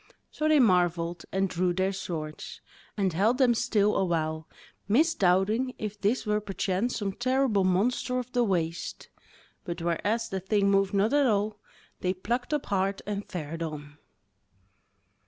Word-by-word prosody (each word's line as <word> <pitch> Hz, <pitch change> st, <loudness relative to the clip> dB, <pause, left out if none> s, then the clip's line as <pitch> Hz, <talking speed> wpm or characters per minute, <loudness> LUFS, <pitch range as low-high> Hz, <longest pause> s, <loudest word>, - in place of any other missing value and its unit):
So 310 Hz, -, -1 dB
they 310 Hz, -1 st, +5 dB
marvelled, 175 Hz, -6 st, +2 dB
and 195 Hz, 0 st, +1 dB
drew 180 Hz, 0 st, 0 dB
their 190 Hz, +2 st, 0 dB
swords, 160 Hz, -5 st, -6 dB, 0.4 s
and 190 Hz, -4 st, +1 dB
held 215 Hz, +8 st, +2 dB
them 255 Hz, -3 st, +4 dB
still 210 Hz, -2 st, +1 dB
awhile, 160 Hz, -3 st, -1 dB, 0.4 s
misdoubting 225 Hz, -, +2 dB
if 210 Hz, -1 st, -6 dB
this 220 Hz, +6 st, +1 dB
were 210 Hz, 0 st, +1 dB
perchance 195 Hz, +3 st, -1 dB
some 200 Hz, -3 st, -2 dB
terrible 255 Hz, -3 st, +1 dB
monster 215 Hz, +7 st, +1 dB
of 250 Hz, 0 st, -4 dB
the 245 Hz, -1 st, +2 dB
waste; 170 Hz, -5 st, -2 dB, 0.5 s
but 170 Hz, -1 st, -5 dB
whereas 205 Hz, +7 st, -1 dB
the 190 Hz, -, -2 dB
thing 200 Hz, +1 st, +1 dB
moved 195 Hz, 0 st, +2 dB
not 210 Hz, +6 st, +2 dB
at 290 Hz, -2 st, +4 dB
all, 210 Hz, -1 st, 0 dB, 0.4 s
they 185 Hz, +1 st, -1 dB
plucked 240 Hz, +8 st, -2 dB
up 295 Hz, -2 st, -1 dB
heart 195 Hz, 0 st, 0 dB
and 205 Hz, -1 st, -4 dB
fared 165 Hz, -3 st, -5 dB
on. 150 Hz, -2 st, -6 dB
195 Hz, 150 wpm, -28 LUFS, 180-230 Hz, 0.5 s, they